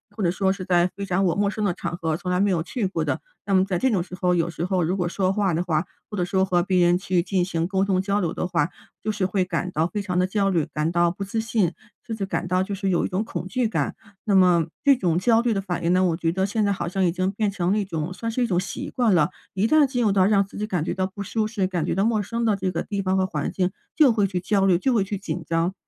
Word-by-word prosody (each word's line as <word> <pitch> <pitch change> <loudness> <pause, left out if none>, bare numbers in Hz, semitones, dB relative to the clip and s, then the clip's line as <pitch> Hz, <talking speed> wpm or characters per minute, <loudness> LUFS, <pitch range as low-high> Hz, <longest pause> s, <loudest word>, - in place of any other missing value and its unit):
或 215 - -5
者 170 - +3
说 190 +1 +1
是 190 -2 -4
在 175 -1 +2
非 200 - -3
常 190 0 +1
我 175 - +2
陌 200 0 +1
生 215 0 -3
的 190 -4 +1
场 175 - -4
合， 160 -3 -2
从 180 - -5
来 180 - +1
没 200 0 +3
有 165 -3 +1
去 225 +1 -3
过 190 - -1
的。 - - -1 0.2
那 200 - -1
么 185 0 +5
在 190 -3 -1
这 260 - +2
种 190 -6 +1
时 180 - -15
候， 180 -1 +1
有 170 0 +1
时 170 +1 -3
候 185 -2 +1
如 180 +4 0
果 175 -1 0
说 185 +1 0
话 195 -3 +1
的 170 +2 0
话， 160 -1 0 0.2
或 210 - -6
者 175 - +1
说 190 +1 +1
和 180 -2 +2
别 180 -2 +3
人 175 +1 +4
去 180 -2 0
进 185 -2 0
行 165 -3 -1
沟 190 +1 0
通 190 -2 +1
交 200 +1 0
流 170 -4 -1
的 - - -2
话， 170 -4 +1 0.3
就 215 - -3
是 200 -3 0
会 185 0 0
感 180 0 -2
到 160 +1 +1
非 205 +4 -3
常 180 -2 -1
地 185 - +2
焦 195 0 +1
虑， 165 -4 +1
感 155 +2 0
到 175 0 +3
不 195 +2 -6
自 210 +3 -3
信， 215 -6 +1 0.3
甚 230 - -5
至 195 -3 -3
感 185 - -2
到 185 +1 +1
就 195 +1 -3
是 195 0 -2
有 175 - +1
一 - - 0
种 190 +4 -1
恐 185 - -5
惧 245 0 0
感。 - - -1 0.3
那 200 -2 +2
么 180 -3 +5 0.2
这 280 -3 +5
种 175 -5 +1
焦 225 +4 +4
虑 235 -1 +1
的 195 - -1
反 180 -4 -4
应 175 - +3
呢， 185 +1 +3
我 165 -3 +1
觉 165 -2 0
得 190 +1 +1
现 210 +1 0
在 200 - +2
好 175 -2 -3
像 190 0 0
已 170 - +2
经 185 +1 0
变 210 0 0
成 185 -2 -1
了 210 - +2
一 200 - -1
种 165 -1 -3
算 230 +5 -4
是 245 +2 0
一 - - +1
种 175 -3 +1
习 185 - -5
惯 230 -7 +2
了。 150 -3 +3 0.2
一 195 +3 +1
旦 300 +2 +5
进 245 -2 -1
入 210 - +3
到 190 -1 +4
让 200 -1 +4
自 200 - -12
己 210 +1 -2
感 180 -7 -1
觉 - - -2
到 185 0 -1
不 200 +1 -7
舒 215 +2 -1
适， 205 -4 -1
感 175 -4 -2
觉 - - -1
到 195 - +2
陌 220 -2 +2
生 230 +4 -3
的 215 -3 +2
这 190 -1 -1
个 170 - -2
地 200 -2 -3
方 190 0 0
和 190 - +2
环 150 -6 -3
境， 185 0 0 0.2
就 295 -6 +6
会 205 -3 +2
去 180 -2 -3
焦 195 0 +2
虑， 180 -3 +4
就 255 +7 +1
会 210 -4 +3
去 200 0 -3
紧 180 -3 -5
张， 165 +3 0
190 Hz, 340 characters per minute, -24 LUFS, 175-205 Hz, 0.3 s, 就